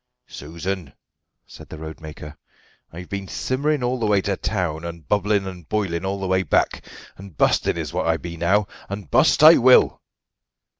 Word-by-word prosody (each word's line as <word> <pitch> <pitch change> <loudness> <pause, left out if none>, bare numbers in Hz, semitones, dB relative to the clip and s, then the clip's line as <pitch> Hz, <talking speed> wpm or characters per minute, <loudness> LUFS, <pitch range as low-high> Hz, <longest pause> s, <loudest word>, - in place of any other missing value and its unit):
"Susan," 85 +2 -6 0.5
said - - -14
the - - -8
roadmaker, 80 -1 -9 0.6
"I've 90 +2 -9
been 100 -1 -5
simmering 140 +5 -1
all 125 +1 -1
the 110 - 0
way 105 -1 +3
to 100 0 -1
town, 90 -6 -3
and 85 -3 -8
bubbling 105 -1 +1
and 90 -4 -9
boiling 95 -5 -2
all 100 +1 -2
the 95 - -4
way 95 0 +1
back, 90 - 0 0.3
and 95 -5 -13
busting - - +2
is - - -5
what - - -1
I 80 0 +2
be 85 +1 -8
now, 95 +5 +1 0.2
and 100 -6 -7
bust - - +4
I 160 +2 +10
will." 130 +1 +5
95 Hz, 170 wpm, -22 LUFS, 85-105 Hz, 0.6 s, I